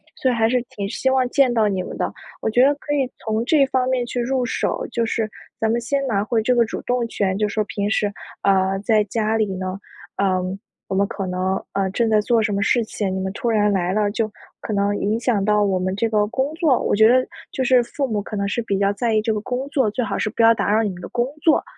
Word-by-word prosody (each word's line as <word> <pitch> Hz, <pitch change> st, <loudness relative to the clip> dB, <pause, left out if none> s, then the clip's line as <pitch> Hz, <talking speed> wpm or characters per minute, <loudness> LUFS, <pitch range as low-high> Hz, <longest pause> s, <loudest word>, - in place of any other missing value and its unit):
所 260 Hz, -, 0 dB
以 -, -, 0 dB
还 225 Hz, -1 st, +2 dB
是 250 Hz, 0 st, +2 dB, 0.2 s
挺 200 Hz, -1 st, -3 dB
希 265 Hz, -, 0 dB
望 260 Hz, -1 st, +2 dB
见 265 Hz, -2 st, +3 dB
到 220 Hz, -2 st, +3 dB
你 190 Hz, -3 st, -1 dB
们 -, -, -7 dB
的。 -, -, -1 dB, 0.3 s
我 -, -, 0 dB
觉 245 Hz, +3 st, +4 dB
得 285 Hz, -, +4 dB
可 290 Hz, +1 st, -4 dB
以 270 Hz, -3 st, +1 dB, 0.2 s
从 220 Hz, +1 st, -1 dB
这 295 Hz, 0 st, +4 dB
方 260 Hz, -1 st, 0 dB
面 255 Hz, -1 st, +1 dB
去 245 Hz, +1 st, -4 dB
入 255 Hz, +1 st, 0 dB
手， 245 Hz, -, -1 dB
就 235 Hz, -, 0 dB
是 225 Hz, -1 st, -1 dB, 0.3 s
咱 220 Hz, 0 st, +1 dB
们 235 Hz, -, +1 dB
先 275 Hz, +4 st, -1 dB
拿 205 Hz, -4 st, +1 dB
回 225 Hz, +1 st, 0 dB
这 250 Hz, +3 st, +2 dB
个 235 Hz, -1 st, +4 dB
主 -, -, -5 dB
动 245 Hz, -1 st, -1 dB
权， 195 Hz, -3 st, -1 dB
就 210 Hz, 0 st, +1 dB
是 200 Hz, -, -6 dB
说 215 Hz, -, +1 dB
平 205 Hz, 0 st, -2 dB
时， 205 Hz, -2 st, +1 dB, 0.3 s
呃， 195 Hz, 0 st, +2 dB
在 215 Hz, -2 st, +3 dB
家 220 Hz, +1 st, -1 dB
里 215 Hz, -, +2 dB
呢， 185 Hz, +1 st, -4 dB, 0.4 s
呃， 185 Hz, -2 st, +1 dB, 0.5 s
我 190 Hz, -, -3 dB
们 200 Hz, +1 st, +2 dB
可 195 Hz, -, -4 dB
能， 185 Hz, +1 st, -1 dB
呃 195 Hz, -1 st, 0 dB
正 230 Hz, +3 st, +1 dB
在 215 Hz, -1 st, +4 dB
做 230 Hz, +1 st, +2 dB
什 210 Hz, -1 st, 0 dB
么 200 Hz, -, 0 dB
事 235 Hz, +2 st, +2 dB
情， 200 Hz, -3 st, -3 dB
你 190 Hz, -, -2 dB
们 190 Hz, 0 st, -2 dB
突 235 Hz, -, -2 dB
然 210 Hz, -2 st, +3 dB
来 180 Hz, -2 st, 0 dB
了， 210 Hz, 0 st, +1 dB
就 220 Hz, -1 st, -1 dB, 0.3 s
可 -, -, -5 dB
能 200 Hz, 0 st, +1 dB
影 215 Hz, +3 st, 0 dB
响 230 Hz, -4 st, +1 dB
到 210 Hz, 0 st, +3 dB
我 195 Hz, -2 st, +1 dB
们 185 Hz, +1 st, -1 dB
这 225 Hz, +3 st, 0 dB
个 210 Hz, -1 st, +2 dB
工 265 Hz, +6 st, -2 dB
作。 310 Hz, -6 st, +2 dB
我 -, -, +1 dB
觉 220 Hz, +1 st, +6 dB
得 255 Hz, +2 st, +4 dB, 0.3 s
就 260 Hz, -, -2 dB
是 250 Hz, -1 st, +5 dB
父 275 Hz, +3 st, -3 dB
母 210 Hz, -3 st, -1 dB
可 210 Hz, -, -7 dB
能 200 Hz, 0 st, -1 dB
是 235 Hz, -, -1 dB
比 200 Hz, -3 st, -1 dB
较 200 Hz, 0 st, +2 dB
在 225 Hz, +2 st, -1 dB
意 215 Hz, -, +3 dB
这 220 Hz, 0 st, 0 dB
个 210 Hz, -, -1 dB
工 255 Hz, +4 st, -3 dB
作 265 Hz, -7 st, +1 dB
最 245 Hz, +4 st, -1 dB
好 200 Hz, -2 st, -2 dB
是 -, -, -1 dB
不 230 Hz, -, -2 dB
要 225 Hz, 0 st, +7 dB
打 210 Hz, -, -1 dB
扰 220 Hz, +1 st, +3 dB
你 210 Hz, -, 0 dB
们 180 Hz, -2 st, -8 dB
的 175 Hz, -, -6 dB
工 240 Hz, 0 st, 0 dB, 0.2 s
作， 315 Hz, 0 st, +3 dB
220 Hz, 295 characters per minute, -21 LUFS, 200-245 Hz, 0.5 s, 要